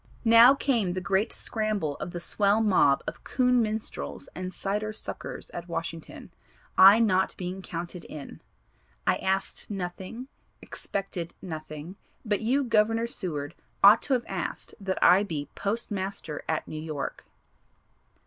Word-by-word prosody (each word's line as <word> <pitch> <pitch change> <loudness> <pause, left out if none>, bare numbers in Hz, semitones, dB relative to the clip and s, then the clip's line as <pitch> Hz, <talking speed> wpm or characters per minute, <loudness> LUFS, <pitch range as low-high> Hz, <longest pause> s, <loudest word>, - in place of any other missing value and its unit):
"Now 230 +4 +8
came 235 -10 +1
the 185 - -2
great 195 +4 0
scramble 215 -9 -1
of - - -5
the 175 - -5
swell 200 +4 +2
mob 185 -10 +4
of - - -6
coon 250 -1 +2
minstrels 220 0 -4
and 185 0 -5
cider 210 +3 -2
suckers - - -6
at 175 0 -7
Washington, 165 -1 -6 0.4
I 195 +3 +9
not 190 -5 +2
being 185 +1 -5
counted 175 0 -6
in. 145 -3 -9 0.6
I - - +3
asked 190 0 -2
nothing, 195 +5 -5 0.3
expected 190 -4 -5
nothing, 155 0 -7 0.3
but 210 -2 0
you 260 +6 +2
Governor 225 -1 +2
Seward 160 -9 -3 0.3
ought 205 +3 +9
to 275 - 0
have 245 -2 +1
asked - - -4
that 190 -2 -2
I 185 +2 +7
be 155 -8 -4
Post 215 +4 -2
Master 190 -6 -4
at 155 - -1
New 155 - -6
York." 155 -3 -5
195 Hz, 140 wpm, -27 LUFS, 175-220 Hz, 0.6 s, I